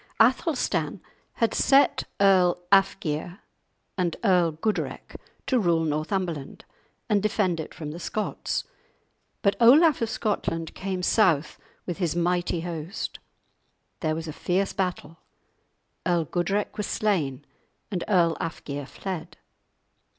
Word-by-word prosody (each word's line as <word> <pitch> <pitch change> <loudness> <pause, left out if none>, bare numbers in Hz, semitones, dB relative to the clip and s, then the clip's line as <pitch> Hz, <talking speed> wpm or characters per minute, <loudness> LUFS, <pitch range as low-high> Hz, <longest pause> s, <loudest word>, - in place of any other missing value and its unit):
Athelstan 225 - +2 0.3
had 230 - +1
set 275 +1 +4
Earl 190 -3 +5
Alfgeir 180 -3 +2 0.6
and 175 -2 0
Earl 180 -6 +3
Gudrek 210 +8 -3 0.3
to 255 - +2
rule 170 -5 +2
Northumberland 155 -1 -2 0.4
and 210 -4 +2
defend 195 -5 +1
it 155 - -5
from 150 -2 -7
the 165 - -7
Scots. 215 +4 -2 0.8
But 200 -2 +3
Olaf 285 +5 +6
of 230 - 0
Scotland 165 -7 -2
came 190 -1 -4
south 175 -8 +2 0.3
with 175 0 -4
his 170 -3 0
mighty 175 0 0
host; 170 +2 -5 0.8
there 155 -2 0
was 165 0 -5
a 155 - -5
fierce 190 +5 0
battle; 180 -4 -3 0.9
Earl 175 -3 +1
Gudrek 195 +6 -1
was 210 - -2
slain 150 -10 -1 0.5
and 180 -4 -2
Earl 175 -5 +3
Alfgeir 145 -3 -5
fled. 175 -2 -6
180 Hz, 120 wpm, -26 LUFS, 165-205 Hz, 0.9 s, Olaf